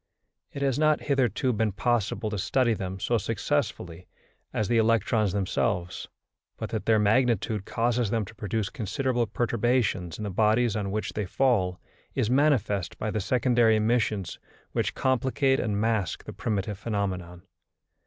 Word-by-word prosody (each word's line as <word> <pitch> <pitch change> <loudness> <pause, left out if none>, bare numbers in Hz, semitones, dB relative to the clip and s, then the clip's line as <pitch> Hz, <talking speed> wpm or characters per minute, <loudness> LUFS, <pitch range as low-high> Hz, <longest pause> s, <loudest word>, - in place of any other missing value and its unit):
It 140 - -4
has 135 -1 +1
not 155 -1 +3
hitherto 130 -2 +1
been 110 -1 0
possible 110 0 0
to 105 - -2
study 120 +4 +2
them 95 -2 -4
so 120 +4 +1
successfully 105 - -2 0.4
as 105 - -1
the 115 -1 +3
electrons 110 -2 +2
themselves; 90 -2 -1 0.5
but - - -5
that - - -3
their 110 -1 +5
magnitude 110 -1 +2
causes 120 -1 0
them 110 -1 0
to 95 - -12
produce 105 -1 -3
considerable 120 +2 -1
perturbations 120 -7 0
in 105 - -6
the 100 - -3
bodies 110 +3 +2
on 100 -2 -2
which 105 +2 -3
they 105 -3 -3
fall 95 -7 +1 0.4
is 110 - +1
manifest 125 - +1
by 110 - -2
the 105 - -1
secondary 120 +1 +3
emissions 110 -3 0 0.3
which - - -1
complicate 130 +1 +1
and 105 -2 -1
mask 110 -6 0
the - - -8
primitive 105 -2 -2
phenomenon. 90 -5 -3
110 Hz, 150 wpm, -27 LUFS, 100-120 Hz, 0.5 s, their